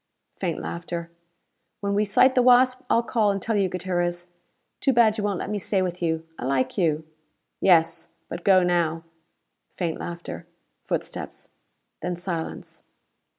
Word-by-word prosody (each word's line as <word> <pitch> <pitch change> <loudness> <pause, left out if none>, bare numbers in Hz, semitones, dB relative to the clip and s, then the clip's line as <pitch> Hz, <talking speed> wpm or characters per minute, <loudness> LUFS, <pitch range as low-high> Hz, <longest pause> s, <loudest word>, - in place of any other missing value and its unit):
Faint - - -3
laughter. 165 - -5 0.7
"When 200 0 -1
we 210 +1 +2
sight 255 +6 +5
the 255 - +4
Wasp, 255 +1 +5
I'll 230 - +3
call 225 -3 +2
and 200 0 0
tell 220 +3 -1
you, 195 -2 +2
Gutierrez. 175 -1 -2 0.5
Too 270 - +2
bad 225 -3 +5
you - - -2
won't 205 -2 0
let - - -4
me 210 - -1
stay 195 -1 +1
with 180 -1 -4
you. 160 -1 -1
I - - -4
like 130 -1 0
you." 160 -4 +1 0.5
"Yes. 165 -3 +3 0.2
But 170 0 -6
go 185 -2 +5
now!" 170 -2 +1 0.7
Faint 170 -3 -3
laughter. 170 0 -7 0.4
Footsteps. - - -4 0.5
Then 180 - -2
silence. 170 -2 -5
180 Hz, 150 wpm, -25 LUFS, 170-205 Hz, 0.7 s, sight